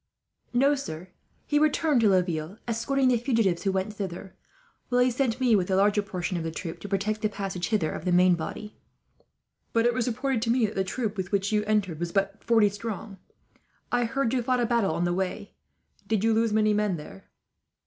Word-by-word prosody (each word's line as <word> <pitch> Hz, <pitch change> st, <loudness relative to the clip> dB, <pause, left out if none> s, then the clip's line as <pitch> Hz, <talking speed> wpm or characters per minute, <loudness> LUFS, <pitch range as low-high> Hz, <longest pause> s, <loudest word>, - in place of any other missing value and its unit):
"No, 275 Hz, +4 st, +3 dB
sir. 185 Hz, -, -6 dB, 0.4 s
He 295 Hz, -, +2 dB
returned 305 Hz, -3 st, +2 dB
to 215 Hz, -, +5 dB
Laville, 180 Hz, -1 st, 0 dB
escorting 255 Hz, +3 st, +1 dB
the 245 Hz, -, +3 dB
fugitives 225 Hz, -8 st, +1 dB
who 195 Hz, -, +2 dB
went 190 Hz, +2 st, -2 dB
thither; 190 Hz, -2 st, -6 dB, 0.5 s
while 245 Hz, -, +2 dB
he 250 Hz, 0 st, +4 dB
sent 245 Hz, -1 st, -1 dB
me, 250 Hz, -4 st, +4 dB
with 185 Hz, -3 st, +1 dB
the 190 Hz, -, +1 dB
larger 205 Hz, +2 st, +3 dB
portion 185 Hz, -2 st, -3 dB
of 165 Hz, -, -3 dB
the 165 Hz, -, -2 dB
troop, 165 Hz, +1 st, -6 dB
to 205 Hz, -, -8 dB
protect 210 Hz, +2 st, -1 dB
the 215 Hz, -, +1 dB
passage 195 Hz, -3 st, -4 dB
hither 210 Hz, -9 st, 0 dB
of -, -, -6 dB
the 180 Hz, -, 0 dB
main 180 Hz, +1 st, +5 dB
body." 190 Hz, +6 st, -6 dB, 0.9 s
"But 230 Hz, 0 st, +3 dB
it 240 Hz, -, +3 dB
was 250 Hz, 0 st, -1 dB
reported 250 Hz, 0 st, -1 dB
to 230 Hz, -, -1 dB
me 240 Hz, -1 st, +3 dB
that 210 Hz, -, -4 dB
the 190 Hz, -, 0 dB
troop 215 Hz, +1 st, -3 dB
with 185 Hz, -1 st, -4 dB
which 200 Hz, 0 st, 0 dB
you 210 Hz, -1 st, +2 dB
entered 205 Hz, -7 st, 0 dB
was 175 Hz, 0 st, -3 dB
but 195 Hz, +1 st, -1 dB
forty 225 Hz, -3 st, +4 dB
strong. 205 Hz, -1 st, -6 dB, 0.7 s
I 245 Hz, 0 st, +2 dB
hear 270 Hz, +4 st, -1 dB
you 250 Hz, +1 st, +1 dB
fought 250 Hz, +1 st, +1 dB
a 240 Hz, -, +2 dB
battle 225 Hz, -8 st, +1 dB
on 175 Hz, -, -1 dB
the 175 Hz, -, 0 dB
way. 190 Hz, +2 st, -3 dB, 0.5 s
Did 220 Hz, -2 st, 0 dB
you 225 Hz, 0 st, +3 dB
lose 225 Hz, 0 st, +2 dB
many 215 Hz, 0 st, +3 dB
men 210 Hz, -4 st, 0 dB
there?" 95 Hz, -11 st, -12 dB
210 Hz, 215 wpm, -27 LUFS, 190-235 Hz, 0.9 s, to